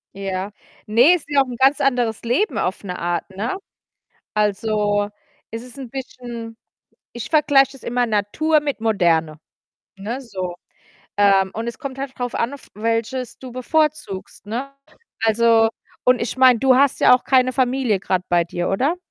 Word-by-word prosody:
Ja. 195 0 -4 0.4
Ne, 240 +10 +6
ist 320 -4 -7
ja 285 -1 +4
auch - - +1
'n 250 - -6
ganz 270 +2 +4
anderes 245 -5 +1
Leben 250 - 0
auf 185 +4 -2
'ne 180 -2 -5
Art, 175 +2 -2
ne? 205 - -3 0.8
Also, 210 0 0 0.4
es 225 +1 -6
ist 250 +2 -13
'n 260 -4 -7
bisschen 240 -3 -7 0.6
ich 240 - -6
vergleiche 275 -3 +4
das 270 - -15
immer 245 +1 0
Natur 235 +9 +1
mit 285 -6 -4
Moderne, 165 -8 +1 0.6
ne, 220 +7 -5
so. 185 -8 -5 0.6
Ähm, 195 -2 +4
und 225 +2 -4
es 235 - -7
kommt 275 -4 -6
halt 275 -1 -4
drauf 245 -1 -3
an, 235 +3 -1
auf 285 - -11
welches 230 +3 -2
du 260 - -9
bevorzugst, 275 -6 -2
ne? 240 +6 -4 0.5
Also, 225 0 +4 0.3
und 250 -1 +4
ich 230 +1 -3
meine, 255 -2 +6
du 265 +2 +4
hast 275 0 +3
ja - - +7
auch 250 - -1
keine 255 -1 +3
Familie 255 -5 +1
grade 185 -1 -1
bei 175 -1 +3
dir, 175 +1 -3
oder? 270 - +1
235 Hz, 165 wpm, -21 LUFS, 205-265 Hz, 0.8 s, ja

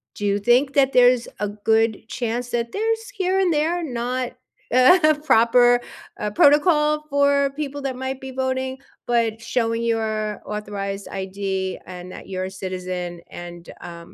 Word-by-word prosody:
do 205 0 0
think 245 +6 +3
that 275 -1 +3
there's 245 -1 +5
a 210 - -1
good 220 +1 0
chance 240 +1 -3
that 235 -1 -2
there's 450 +2 -1
here 385 -5 0
and 375 -2 +2
there 325 +3 0
not, 250 -2 -3 0.4
uh, 310 +5 +6
proper, 245 -1 +5 0.4
uh, 210 - -1
protocol 300 - +4
for 280 -1 +3
people 285 -1 -4
that 270 -2 -3
might 265 +1 -5
be 265 0 -7
voting, 260 0 -2 0.3
but 230 -2 0
showing 230 -1 -1
your 220 -2 -1
authorized 200 -1 -5
ID, 190 0 -3
and 180 0 -9
that - - -11
you're 185 -1 -3
a 190 - -6
citizen, 180 -2 -5 0.2
and, 175 -1 -10 0.3
um, 170 0 -11
240 Hz, 150 wpm, -22 LUFS, 205-275 Hz, 0.4 s, uh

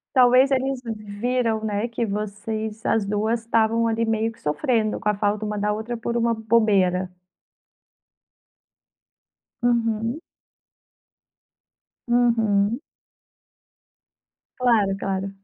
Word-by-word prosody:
Talvez 255 +2 +5
eles 265 0 0
viram, 220 +1 -2
né, 210 +2 -1
que 230 0 -2
vocês 215 +1 -4
as 225 -2 +2
2 215 +3 0
estavam 230 0 +1
ali, 225 0 0
meio 225 0 0
que 225 - -18
sofrendo 215 - 0
com 210 - -2
a 210 - +3
falta 205 +1 -1
uma 210 0 -3
da 210 +1 0
outra, 220 +3 -4
por 235 +1 -3
uma 235 0 +2
bobeira. 205 -5 +2 2.5
Uhum. 230 +2 0 1.9
Uhum. 230 -2 +2 1.8
Claro, 220 -6 +2
claro. 195 0 -2
220 Hz, 100 wpm, -23 LUFS, 210-235 Hz, 2.5 s, Talvez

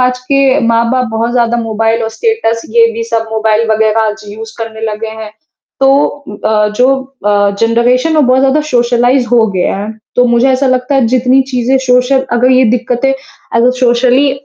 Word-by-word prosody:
आज 250 0 -1
के 275 -1 +2
माँ-बाप 235 +2 +1
बहुत 225 +2 -2
ज़्यादा 240 -1 +1
मोबाइल 225 0 -1
और 225 - -2
स्टेटस 445 - -1
ये 230 0 +3
भी 230 +1 -4
सब 230 -1 -3
मोबाइल 220 0 0
वगैरह 220 0 +1
आज 215 0 -5
यूज़ 220 +2 -9
करने 225 -1 -7
लगे 220 +1 -5
हैं। 210 - -8 0.5
तो 270 - +4 0.4
उम 205 - -8
अ, 210 -1 +1
जो 260 +2 +3 0.3
अ, 205 -1 +2
जनरेशन 245 +7 +1
वो - - +4
बहुत 255 0 +2
ज़्यादा 275 +3 +2
सोशलाइज़ 245 +1 +1
हो 235 -2 +3
गया 185 +1 -1
है, 210 +2 -5 0.2
तो 250 - +4
मुझे 240 +2 +2
ऐसा 265 +1 +1
लगता 255 +2 0
है 265 -4 +2
जितनी 255 +2 +2
चीज़ें 255 +1 0
सोशल 250 +2 +2
अगर 245 +2 +2
ये 255 0 +4
दिक्कतें 250 +2 0 0.4
अगर 240 +2 +3
सोशली 255 +3 +2
240 Hz, 185 wpm, -11 LUFS, 225-255 Hz, 0.5 s, तो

